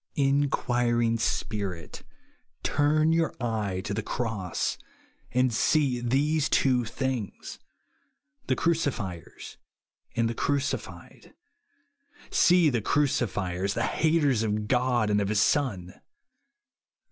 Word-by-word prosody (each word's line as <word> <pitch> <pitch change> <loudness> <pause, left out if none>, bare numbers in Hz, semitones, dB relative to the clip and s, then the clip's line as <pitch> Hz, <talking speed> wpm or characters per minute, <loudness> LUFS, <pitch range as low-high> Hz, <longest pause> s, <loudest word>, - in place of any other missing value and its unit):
Inquiring 120 -5 +1
spirit, 100 -7 -3 0.6
turn 155 +2 +2
your 165 0 0
eye 110 -6 -2
to 100 +1 -4
the 110 - -2
cross 110 -5 -3 0.5
and 125 0 +2
see 135 +1 +2
these 145 +5 +1
two 125 -3 +2
things, 130 -3 -4 0.4
— 140 0 -45
the 130 - +2
Cruci 165 -2 +1
fiers 90 -8 -8 0.6
and 115 0 +2
the 115 - -2
Crucified. 140 +3 -4 1.0
See 175 -4 +4
the 120 -3 0
Cruci 140 -1 +1
fiers, 95 +1 -2
the - - 0
haters 155 -7 +2
of 105 -1 -1
God 125 -3 +1
and 105 0 +2
of 100 - -1
his 105 -1 +1
Son. 110 -7 0
120 Hz, 110 wpm, -27 LUFS, 105-140 Hz, 1.0 s, See